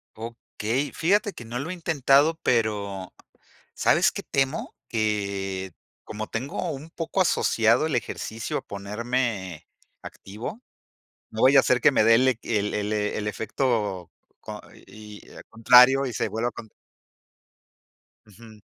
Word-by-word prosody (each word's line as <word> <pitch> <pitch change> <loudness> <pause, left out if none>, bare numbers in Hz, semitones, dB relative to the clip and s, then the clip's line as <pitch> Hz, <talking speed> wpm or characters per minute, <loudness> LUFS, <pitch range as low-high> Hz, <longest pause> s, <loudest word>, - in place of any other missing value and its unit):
Okey, 115 +3 -4
fíjate 200 +4 +1
que 120 - -11
no 115 +2 -5
lo 140 +5 -5
he - - -3
intentado, 155 -2 +2
pero, 100 -5 -1 0.6
¿sabes - - +3
qué - - -6
temo? 135 +2 -1
Que, 100 -4 -2 0.3
como 110 0 -6
tengo 130 +5 -4
un 145 +3 -8
poco 165 +2 -4
asociado 115 -7 +3
el 155 - -1
ejercicio 110 -1 -4
a - - -4
ponerme 105 -3 -3 0.3
activo, 115 - -8 0.7
no 110 - -4
vaya 135 +2 +7
a - - +3
ser 125 -1 +2
que 150 - +6
me 130 - +3
dé 115 - +7
el, 130 +3 +3
eh 130 - +1
que 115 -2 -1
el 105 +1 -2
el 105 +1 -2
el 105 0 -2
efecto 105 -4 -2 0.3
co - - -8
co - - -19
y 105 -1 -13
y, - - -17
eh, - - -12
contrario 125 +4 +6
y 125 - -4
se - - -2
vuelva 115 +2 -2
cont 110 -3 -11 1.5
Ujú. 110 +1 -16
115 Hz, 150 wpm, -25 LUFS, 105-135 Hz, 1.5 s, vaya